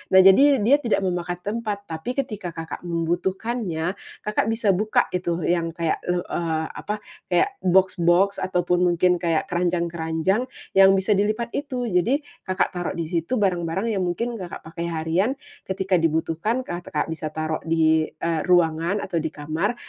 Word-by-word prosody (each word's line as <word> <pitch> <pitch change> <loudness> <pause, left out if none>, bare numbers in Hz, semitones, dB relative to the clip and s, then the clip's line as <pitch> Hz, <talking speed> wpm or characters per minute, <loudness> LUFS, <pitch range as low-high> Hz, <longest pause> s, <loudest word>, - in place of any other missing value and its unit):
Nah - - +10
jadi 275 +9 +7
dia 280 +6 +5
tidak 230 -6 0
memakan 175 -1 -2
tempat, 210 -1 -3
tapi 165 +10 -5
ketika 215 -9 -3
Kakak 165 0 -6
membutuhkannya, 175 +2 -2 0.3
Kakak 210 0 0
bisa 225 -3 +2
buka 210 +4 +2
itu 175 -2 -1
yang 170 -1 0
kayak 165 -2 0
le 180 0 0
eee, 160 -2 -2
apa, 210 - -4 0.3
kayak 390 - +1
boks-boks 185 +1 +3
ataupun 180 -1 +1
mungkin 175 0 +3
kayak 165 -2 0
keranjang-keranjang 170 +4 0 0.3
yang 195 0 +7
bisa 190 +2 0
dilipat 215 +4 0
itu. 255 -4 -3
Jadi, 230 - +1 0.2
Kakak 185 0 +1
taruh 175 -1 -3
di 165 - -2
situ 170 +8 -1
barang-barang 190 +3 0
yang 190 - 0
mungkin 225 +6 -2
Kakak 180 -2 -7
pakai 170 +1 -4
harian, 165 +8 0 0.4
ketika 190 0 0
dibutuhkan 165 +9 0
Kakak 175 -2 -3
bisa 155 -1 -4
taruh 155 0 -2
di, 160 -1 +3
eee, 165 0 -2
ruangan 175 +2 +2
atau 170 -3 -1
di 160 - -2
kamar, 160 +10 -2
180 Hz, 155 wpm, -23 LUFS, 165-205 Hz, 0.4 s, Nah